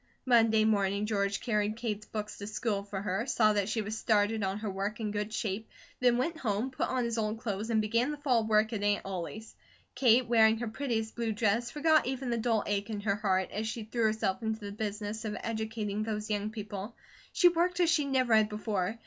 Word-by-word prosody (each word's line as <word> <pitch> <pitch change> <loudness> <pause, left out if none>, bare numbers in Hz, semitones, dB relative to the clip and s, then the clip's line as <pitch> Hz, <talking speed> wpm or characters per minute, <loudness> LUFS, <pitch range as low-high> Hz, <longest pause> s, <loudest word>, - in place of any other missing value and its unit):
Monday 225 -3 +4
morning 200 -1 +1
George 200 -2 0
carried 215 -2 0
Kate's 215 -3 -4
books 210 -1 -5
to 200 - -6
school 215 -1 -1
for 200 -1 -5
her, 205 +5 -1
saw 215 -4 +3
that 205 -1 0
she 220 0 -1
was 215 +2 -4
started 220 0 +1
on 195 0 -1
her 210 0 -4
work 200 +3 -3
in 215 -2 -2
good 210 +1 -3
shape, 220 0 -3 0.3
then 245 -1 +4
went 320 +6 -1
home, 225 +2 -1
put 260 - -1
on 255 -1 0
his 235 -1 -1
old 215 0 -1
clothes, 220 -1 -4
and 220 -2 +3
began 230 +5 +1
the 300 - -3
fall 255 -6 +2
work 220 +1 +2
at 210 - -2
Aunt 205 0 +1
Ollie's. 195 +4 -6 0.4
Kate, 250 -1 +4
wearing 225 -1 +5
her 240 +1 -3
prettiest 225 -2 -2
blue 230 -1 -1
dress, 225 +2 +1
forgot 310 -2 +3
even 260 -1 -2
the 235 - 0
dull 225 -2 +1
ache 205 +1 -1
in 210 -2 -3
her 200 -1 0
heart, 190 -3 0
as 215 +2 -3
she 220 +1 -4
threw 225 +1 -1
herself 215 -2 0
into 220 -1 -2
the 205 -1 -6
business 210 +1 -4
of 210 -1 -3
educating 220 -2 -3
those 215 -1 -3
young 205 0 -1
people. 210 0 -6 0.4
She 355 - +5
worked 350 +1 0
as 340 -2 +4
she 305 -3 +2
never 260 -4 +2
had 215 -1 +5
before. 210 -1 -2
220 Hz, 220 wpm, -30 LUFS, 205-235 Hz, 0.4 s, wearing